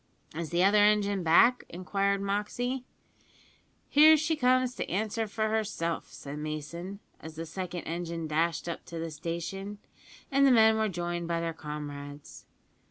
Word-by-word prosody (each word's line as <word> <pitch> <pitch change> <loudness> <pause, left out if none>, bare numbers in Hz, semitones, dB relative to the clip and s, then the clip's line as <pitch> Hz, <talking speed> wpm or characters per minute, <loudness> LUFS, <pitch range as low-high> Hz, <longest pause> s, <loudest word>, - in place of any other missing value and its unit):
"Is 165 -1 -4
the 175 +1 +2
other 205 +2 +5
engine 205 -2 +3
back?" 205 +10 +5
inquired 195 +2 -1
Moxey. 245 +6 -2 1.0
"Here 310 +2 +7
she 310 +2 0
comes 255 -2 +2
to - - -5
answer 220 +4 -1
for 215 +1 -1
herself," 210 -6 -2
said 145 +1 -8
Mason, 155 +6 -5 0.2
as 160 0 -10
the 165 +1 -5
second 175 +1 -5
engine 170 0 -4
dashed 160 +2 0
up 170 - -4
to 170 - -8
the 165 0 -4
station, 170 +6 -5 0.5
and 275 0 +5
the - - +6
men 220 -2 +6
were 220 -1 +1
joined 175 -1 -3
by 170 -1 0
their 165 0 -2
comrades. 145 -2 -8
180 Hz, 155 wpm, -29 LUFS, 165-215 Hz, 1.0 s, Here